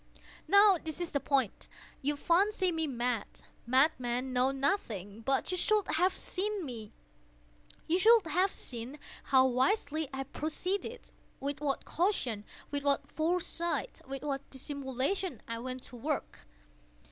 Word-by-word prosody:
Now 400 -2 +7
this 315 0 -4
is 350 -1 -3
the 280 - +1
point. 270 -6 0 0.3
You 290 +2 0
fancy 370 +5 +2
me 320 -1 -1
mad. 240 -4 -1 0.4
Madmen 255 -1 +2
know 250 +1 +4
nothing. 230 - -1
But 270 +8 +1
you 365 - -1
should 425 +1 +2
have 360 +4 +2
seen 400 -1 -2
me. 225 -5 -7 0.9
You 345 +3 +2
should 450 0 +6
have 360 +5 +2
seen 245 +3 -6 0.3
how 260 -1 +5
wisely 285 - +1
I 270 0 -3
proceeded—with 310 - -4
what 280 -2 -1
caution—with 285 - -1
what 280 -1 +1
foresight—with 335 - -2
what 280 -1 -3
dissimulation 270 - -2
I 230 0 -3
went 255 +1 -5
to 245 - -9
work! 275 - -3
285 Hz, 125 wpm, -32 LUFS, 255-360 Hz, 0.9 s, Now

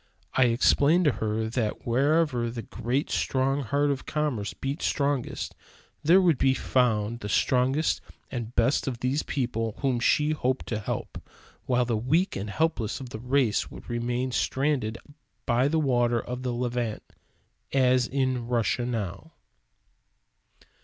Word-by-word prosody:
I 130 - +4
explained 140 +8 +4
to 150 - +5
her 110 -1 -2
that 110 -2 -2
wherever 130 0 +2
the 115 -1 -6
great 125 +8 -2
strong 135 +2 +1
heart 140 +3 +1
of 135 -2 -4
commerce 140 -10 -1
beat 140 +5 -4
strongest, 140 -3 -1 0.5
there 170 +5 +6
would 170 -7 +3
be 130 -1 +3
found 120 -4 +1
the 105 - -6
strongest 130 +7 +2 0.3
and 120 -1 -5
best 120 +5 +2
of 125 -3 -3
these 130 +4 +1
people 115 -5 -2
whom 130 -4 +1
she 150 +5 +3
hoped 130 -4 -1
to 110 - -1
help; 105 - -5 0.5
while 125 -1 +2
the 120 -1 0
weak 155 - +1
and 100 +2 -4
helpless 125 -4 -1
of 130 -2 -8
that 110 - -6
race 125 -2 +1
would - - -12
remain 120 +2 -1
stranded 130 -4 0 0.5
by 125 +2 +2
the 160 +2 +1
waters 120 -5 +2
of 125 +1 -5
the 125 -1 -2
Levant, 120 -2 -2 0.7
as 130 -2 +3
in 130 -3 -1
Russia 120 0 0
now. 100 -6 -4
125 Hz, 145 wpm, -27 LUFS, 115-140 Hz, 0.7 s, there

